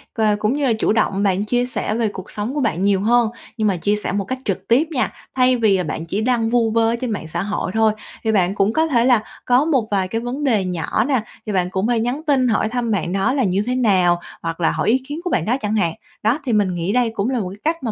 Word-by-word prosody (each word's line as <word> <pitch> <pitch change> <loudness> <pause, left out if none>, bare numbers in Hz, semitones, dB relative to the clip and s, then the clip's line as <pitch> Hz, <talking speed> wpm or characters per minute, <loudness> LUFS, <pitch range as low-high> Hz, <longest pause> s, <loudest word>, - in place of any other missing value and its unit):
và 215 -3 +2
cũng 215 +5 0
như 290 -1 0
là 235 - +3
chủ - - +2
động 205 -2 +1
bạn 195 +1 +1
chia 245 +2 +1
sẻ 245 -3 -2
về 230 -2 +1
cuộc 190 -2 -8
sống 210 +5 -4
của 295 - -1
bạn 185 -6 0
nhiều 195 -1 +2
hơn, 235 +2 +3 0.3
nhưng 215 - +1
mà 195 -3 +1
chia 205 +5 +1
sẻ 210 - -3
một 200 0 -1
cách 260 +5 -3
trực 195 -1 -3
tiếp 270 +8 +3
nha. 265 -5 0 0.2
Thay 255 -1 +4
vì 215 -4 +3
là 180 - -1
bạn 160 +1 -4
chỉ 200 +6 -2
đăng 230 -2 +1
vu 230 -2 +2
vơ 225 0 +3
ở 235 - +1
trên 250 -3 -2
mạng 180 -6 -4
xã 170 +3 -3
hội 205 -2 -2
thôi 220 -1 +3 0.3
thì 220 - +1
bạn 190 -2 +2
cũng 205 +3 +2
có 320 +1 +2
thể 240 -5 +2
là 245 -4 +4 0.2
có 250 +4 +3
một 265 -9 +1
vài 190 -2 +1
cái 225 +4 -3
vấn 255 +5 -4
đề 220 -8 +2
nhỏ 180 +4 -1
nè, 260 -6 +2 0.2
thì 215 - -3
bạn 180 -2 0
cũng 190 +3 -1
thề 240 -2 +1
nhắn 245 +6 -1
tin 265 -3 +3
hỏi 215 -1 +1
thăm 240 -1 -2
bạn 180 -3 -1
đó 195 +7 +1
là 270 -3 +1
như 195 +1 +1
thế 250 - 0
nào, 185 -8 +3 0.2
hoặc 165 +1 -4
là 160 - +3
hỏi - - 0
ý 255 +3 +2
kiến 295 +3 -5
của 360 - -2
bạn 175 - 0
đó 245 +4 +1
chẳng 210 0 -1
hạn. 170 -6 +1 0.3
Đó, 230 +7 +2
thì 245 - 0
mình 200 -4 +2
nghĩ 175 +4 -1
đây 245 -2 +2
cũng 210 +2 0
là 260 -2 0
một 185 -4 -3
cái 200 +2 -11
cách 330 -5 -20
mà 230 - -1
220 Hz, 295 wpm, -20 LUFS, 195-245 Hz, 0.3 s, Thay